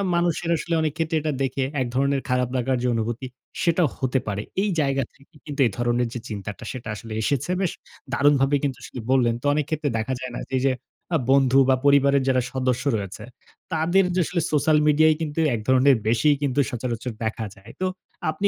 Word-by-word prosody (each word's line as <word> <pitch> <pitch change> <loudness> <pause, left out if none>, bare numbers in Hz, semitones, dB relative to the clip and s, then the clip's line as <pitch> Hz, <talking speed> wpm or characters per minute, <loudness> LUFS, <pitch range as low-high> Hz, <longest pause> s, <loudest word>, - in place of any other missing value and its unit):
মানুষের 170 -1 0
আসলে 170 +2 -3
অনেক 155 -2 0
ক্ষেত্রে 160 -1 0
এটা 155 0 -1
দেখে 135 0 -1 0.2
এক 125 - 0
ধরনের 140 0 +2
খারাপ 125 -1 +1
লাগার 130 +1 0
যে - - +2
অনুভূতি, 115 +3 -2 0.3
সেটা 170 0 +3
হতে 130 0 0
পারে। 105 0 -2 0.2
এই 205 - +1
জায়গা 135 -1 +1
থেকে 140 +5 -24
কিন্তু 145 -1 -7
এ - - -1
ধরনের 120 0 +1
যে 120 - -4
চিন্তাটা 105 +2 -6
সেটা 120 -3 -7
আসলে 110 +1 -8
এসেছে। 140 +8 0
বেশ 185 - +1 0.4
দারুণভাবে 140 0 +3
কিন্তু 135 -3 -1
সেটি 125 - -8
বললেন। 120 -3 +3
তো - - -10
অনেক 150 -1 0
ক্ষেত্রে 155 -2 -1
দেখা 110 +4 -2
যায় 130 -1 -5
না - - -5
যে, 130 - -2
এই - - -3
যে 130 - +3 0.4
আ - - +5
বন্ধু 135 -1 +5
বা 130 - +6
পরিবারের 140 -1 +5
যারা 130 -1 +3
সদস্য 130 -1 0
রয়েছে, 100 -2 -6 0.5
তাদের 175 +5 +3
যে 185 - +3
আসলে 175 +1 -1
সোশ্যাল 150 +1 +3
মিডিয়ায় 155 +1 +5
কিন্তু 155 0 -3 0.2
এক - - -3
ধরণের 130 +1 +5
বেশিই 130 +6 +4
কিন্তু 140 -1 0
সচরাচর 120 -1 -3
দেখা 110 0 -2
যায়। 100 +4 -14
তো 185 - +2 0.4
আপনি 200 +6 0
135 Hz, 200 wpm, -24 LUFS, 125-150 Hz, 0.5 s, বা